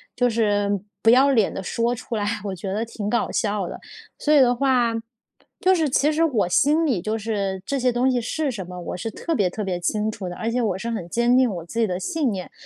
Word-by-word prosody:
就 245 Hz, 0 st, +2 dB
是 205 Hz, -3 st, +1 dB, 0.2 s
不 225 Hz, -, +4 dB
要 265 Hz, +4 st, +6 dB
脸 220 Hz, -6 st, +3 dB
地 190 Hz, -, -5 dB
说 235 Hz, +5 st, 0 dB
出 235 Hz, 0 st, -6 dB
来， 205 Hz, -1 st, -1 dB, 0.2 s
我 195 Hz, -2 st, -3 dB
觉 190 Hz, +2 st, -5 dB
得 220 Hz, +3 st, -1 dB
挺 210 Hz, -2 st, -5 dB
搞 235 Hz, -, 0 dB
笑 205 Hz, -4 st, -1 dB
的。 -, -, -7 dB, 0.4 s
所 300 Hz, -, 0 dB
以 295 Hz, -, +7 dB
的 245 Hz, -2 st, +5 dB
话， 245 Hz, -3 st, +2 dB, 0.7 s
就 375 Hz, 0 st, +5 dB
是 320 Hz, -5 st, +1 dB
其 285 Hz, +4 st, +2 dB
实 320 Hz, +2 st, +1 dB
我 235 Hz, -, +2 dB
心 300 Hz, -, +3 dB
里 230 Hz, -, 0 dB
就 215 Hz, +3 st, -2 dB
是 200 Hz, -3 st, -3 dB
这 280 Hz, -1 st, -1 dB
些 250 Hz, 0 st, +2 dB
东 250 Hz, +2 st, +2 dB
西 245 Hz, -1 st, 0 dB
是 290 Hz, +4 st, -2 dB
什 190 Hz, -6 st, -6 dB
么， 180 Hz, 0 st, -8 dB
我 175 Hz, -, -5 dB
是 225 Hz, +5 st, -4 dB
特 330 Hz, +9 st, -3 dB
别 195 Hz, -, +2 dB
特 210 Hz, +3 st, -5 dB
别 180 Hz, -2 st, -2 dB
清 210 Hz, +5 st, -1 dB
楚 195 Hz, -5 st, -6 dB
的， 175 Hz, -, -7 dB
而 225 Hz, +1 st, -2 dB
且 245 Hz, +1 st, 0 dB
我 195 Hz, -5 st, 0 dB
是 235 Hz, +4 st, -4 dB
很 180 Hz, -7 st, -4 dB
坚 240 Hz, +3 st, +2 dB
定 255 Hz, -2 st, +4 dB
我 170 Hz, -4 st, -5 dB
自 230 Hz, +6 st, -5 dB
己 225 Hz, -, +3 dB
的 180 Hz, 0 st, -2 dB
信 305 Hz, -, -1 dB
念。 185 Hz, -2 st, -6 dB
225 Hz, 275 characters per minute, -23 LUFS, 200-255 Hz, 0.7 s, 以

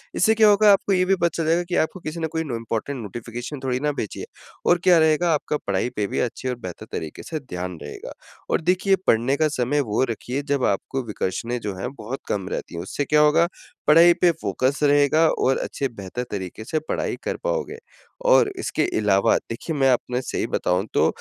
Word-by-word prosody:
इससे 220 Hz, +4 st, +4 dB
क्या 215 Hz, -1 st, +6 dB
होगा 205 Hz, 0 st, +6 dB
आपको 195 Hz, 0 st, +1 dB
ये 185 Hz, -1 st, +3 dB
भी 195 Hz, +1 st, +3 dB
पता 170 Hz, -2 st, +1 dB
चल 165 Hz, -, -1 dB
जाएगा 165 Hz, +2 st, +2 dB
कि 175 Hz, -, -1 dB
आपको 185 Hz, -, -11 dB
किसी 160 Hz, +1 st, -6 dB
ने 160 Hz, -, -1 dB
कोई -, -, +1 dB
इम्पोर्टेंट 120 Hz, -1 st, -4 dB
नोटिफ़िकेशन 120 Hz, +6 st, -6 dB
थोड़ी 125 Hz, -1 st, 0 dB
ना 150 Hz, +2 st, 0 dB
भेजी 105 Hz, -, -6 dB
है। -, -, -5 dB, 0.4 s
और 175 Hz, -, +5 dB
क्या 180 Hz, -2 st, +6 dB
रहेगा 160 Hz, +2 st, +3 dB
आपका 150 Hz, 0 st, -1 dB
पढ़ाई 100 Hz, +4 st, 0 dB
पे 105 Hz, -1 st, -1 dB
भी -, -, -2 dB
अच्छी 125 Hz, +1 st, -2 dB
और 125 Hz, -, -1 dB
बेहतर 90 Hz, -2 st, -7 dB
तरीके 80 Hz, -1 st, -6 dB
से 160 Hz, -, -4 dB
ध्यान 90 Hz, -, -6 dB
रहेगा। 75 Hz, -, -8 dB, 0.4 s
और -, -, +1 dB
देखिए 185 Hz, +3 st, +2 dB
पढ़ने 120 Hz, +5 st, +3 dB
का 155 Hz, -, +3 dB
समय 130 Hz, +4 st, +1 dB
वो 110 Hz, -, +2 dB
रखिए 125 Hz, +5 st, -3 dB
जब 140 Hz, -3 st, 0 dB
आपको 130 Hz, +7 st, -1 dB
विकर्षणें 115 Hz, +4 st, -3 dB
जो 100 Hz, -2 st, -4 dB
हैं 125 Hz, +6 st, -4 dB
बहुत 130 Hz, +2 st, -6 dB
कम 95 Hz, -2 st, -2 dB
रहती -, -, -2 dB, 0.2 s
है। 85 Hz, -, -4 dB
उससे 95 Hz, +10 st, -3 dB
क्या 150 Hz, -, +3 dB
होगा 150 Hz, +3 st, +4 dB, 0.4 s
पढ़ाई 165 Hz, +3 st, +7 dB
पे 175 Hz, -, +6 dB
फ़ोकस 130 Hz, +8 st, 0 dB
रहेगा 145 Hz, +2 st, +4 dB, 0.2 s
और 130 Hz, -, +3 dB
अच्छे 135 Hz, -, -2 dB
बेहतर 100 Hz, +5 st, -5 dB
तरीके 95 Hz, +1 st, -5 dB
से 155 Hz, -, -1 dB
पढ़ाई -, -, -1 dB
कर -, -, -2 dB
पाओगे। -, -, -2 dB, 0.5 s
और 415 Hz, -, +6 dB
इसके 155 Hz, -, -1 dB, 0.2 s
अलावा 100 Hz, -2 st, +3 dB
देखिए 135 Hz, +8 st, -4 dB
मैं 135 Hz, -1 st, +4 dB
आपने 125 Hz, 0 st, 0 dB
सही 125 Hz, -, -3 dB
बताऊँ 90 Hz, +3 st, 0 dB
तो -, -, +4 dB
135 Hz, 210 wpm, -23 LUFS, 110-165 Hz, 0.5 s, पढ़ाई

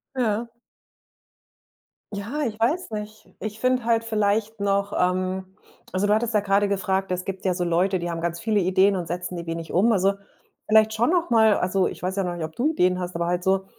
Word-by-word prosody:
Ja. 235 Hz, -2 st, 0 dB, 1.6 s
Ja, 220 Hz, +9 st, -4 dB
ich 220 Hz, -3 st, -3 dB
weiß 305 Hz, +11 st, 0 dB
nicht. 215 Hz, 0 st, -7 dB
Ich 215 Hz, 0 st, -6 dB
finde 255 Hz, -1 st, +1 dB
halt 230 Hz, -1 st, +2 dB
vielleicht 215 Hz, 0 st, 0 dB
noch, 200 Hz, 0 st, 0 dB
ähm 185 Hz, +1 st, -1 dB, 0.4 s
also 190 Hz, +2 st, 0 dB
du 210 Hz, -, +4 dB
hattest 225 Hz, +1 st, 0 dB
ja 210 Hz, -, +4 dB
grade 200 Hz, 0 st, +2 dB
gefragt 195 Hz, -1 st, -1 dB
es 180 Hz, 0 st, -1 dB
gibt 195 Hz, 0 st, -6 dB
ja 185 Hz, -, +2 dB
so 180 Hz, 0 st, -2 dB
Leute, 180 Hz, +2 st, +1 dB
die 175 Hz, 0 st, -3 dB
haben 165 Hz, -1 st, -4 dB
ganz 170 Hz, 0 st, -2 dB
viele 210 Hz, +2 st, +1 dB
Ideen 190 Hz, +2 st, +3 dB
und 175 Hz, -2 st, -3 dB
setzen 180 Hz, +1 st, -4 dB
die 170 Hz, -, -6 dB
wenig 165 Hz, 0 st, -5 dB
um 210 Hz, +7 st, +4 dB
also, 195 Hz, -2 st, +3 dB, 0.5 s
vielleicht 220 Hz, 0 st, +5 dB
schon 235 Hz, +5 st, +1 dB
noch 345 Hz, -2 st, +1 dB
mal 220 Hz, -2 st, +5 dB
also 185 Hz, +1 st, +1 dB
ich -, -, -7 dB
weiß 185 Hz, +1 st, -1 dB
ja 195 Hz, -, 0 dB
noch 175 Hz, -1 st, -3 dB
nicht, 165 Hz, -, -5 dB
ob 160 Hz, -, -10 dB
du 295 Hz, +6 st, +1 dB
Ideen 180 Hz, -, +2 dB
hast, 180 Hz, 0 st, -5 dB
aber 170 Hz, 0 st, -1 dB
halt 175 Hz, 0 st, -1 dB
so, 190 Hz, 0 st, +1 dB
195 Hz, 220 wpm, -24 LUFS, 180-220 Hz, 1.6 s, vielleicht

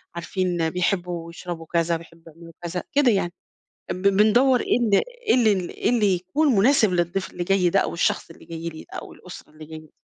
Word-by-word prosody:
عارفين 175 Hz, -1 st, -1 dB
بيحبوا 175 Hz, -1 st, -2 dB
يشربوا 170 Hz, -1 st, -7 dB
كذا، 170 Hz, 0 st, 0 dB
بيحبوا 165 Hz, 0 st, -16 dB
يعملوا 165 Hz, +1 st, -14 dB
كذ، 175 Hz, +1 st, -4 dB
ا -, -, -3 dB
كده 280 Hz, -4 st, +4 dB
يعني. 185 Hz, -4 st, 0 dB, 0.6 s
أمب 185 Hz, +2 st, +1 dB
بندوُر 225 Hz, +6 st, +4 dB
إيه -, -, +1 dB
ال 225 Hz, -4 st, +1 dB, 0.3 s
إيه -, -, +5 dB
ال 240 Hz, -3 st, +4 dB
ال 190 Hz, -4 st, -1 dB
اللي 215 Hz, -5 st, +3 dB
يكون 245 Hz, -, 0 dB
مناسب 220 Hz, -1 st, +4 dB
للضيف 175 Hz, +2 st, -1 dB
اللي 175 Hz, -, -5 dB
جاي 185 Hz, -1 st, +2 dB
ده، -, -, +3 dB
أو -, -, -2 dB
الشخص 170 Hz, -, 0 dB
اللي 165 Hz, -, -14 dB
جاي 165 Hz, 0 st, -6 dB
لي، 160 Hz, -1 st, -9 dB
أو -, -, -8 dB
الأسرة 180 Hz, -, -12 dB
اللي 155 Hz, 0 st, -12 dB
جايين 155 Hz, 0 st, -10 dB
دي. -, -, -29 dB
180 Hz, 205 wpm, -23 LUFS, 170-205 Hz, 0.6 s, إيه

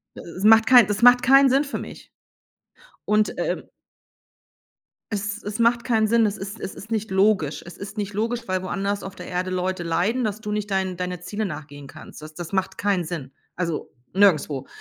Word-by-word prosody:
Es 175 Hz, +3 st, -9 dB
macht 220 Hz, +1 st, +6 dB
kein 245 Hz, -2 st, +8 dB
es 205 Hz, -, -1 dB
macht 245 Hz, +1 st, +7 dB
keinen 270 Hz, +1 st, +6 dB
Sinn 270 Hz, +3 st, +3 dB
für 280 Hz, -, -5 dB
mich. -, -, -10 dB, 0.9 s
Und, 210 Hz, 0 st, +1 dB
ähm -, -, -2 dB, 1.5 s
es 210 Hz, +1 st, -3 dB
es 210 Hz, +2 st, -6 dB
macht 235 Hz, +1 st, +3 dB
keinen 225 Hz, -3 st, +2 dB
Sinn, 230 Hz, +1 st, +3 dB
es 210 Hz, 0 st, -1 dB
ist 200 Hz, +3 st, -7 dB
es -, -, -6 dB
ist 220 Hz, +4 st, -11 dB
nicht 220 Hz, -1 st, -2 dB
logisch. 190 Hz, -6 st, +2 dB
Es 170 Hz, -, -11 dB
ist 200 Hz, +2 st, -9 dB
nicht 205 Hz, -1 st, -3 dB
logisch, 230 Hz, +4 st, -1 dB
weil 185 Hz, 0 st, -1 dB
woanders 200 Hz, +2 st, -2 dB
auf 195 Hz, 0 st, -8 dB
der -, -, -9 dB
Erde 185 Hz, +1 st, -2 dB
Leute 185 Hz, 0 st, -2 dB
leiden, 180 Hz, +10 st, 0 dB
dass 215 Hz, 0 st, -3 dB
du 210 Hz, -1 st, -5 dB
nicht 210 Hz, 0 st, -2 dB
deinen 190 Hz, -2 st, -1 dB
deine 180 Hz, -1 st, -4 dB
Zielen 205 Hz, +4 st, -3 dB
nachgehen 145 Hz, -4 st, -9 dB
kannst. -, -, -12 dB
Das 155 Hz, +1 st, -10 dB
das 170 Hz, +2 st, -8 dB
macht 190 Hz, 0 st, -1 dB
keinen 195 Hz, -4 st, 0 dB
Sinn. 155 Hz, -5 st, -6 dB, 0.2 s
Also 170 Hz, -3 st, -3 dB, 0.2 s
nirgendswo. 155 Hz, -8 st, +2 dB
200 Hz, 195 wpm, -23 LUFS, 180-220 Hz, 1.5 s, kein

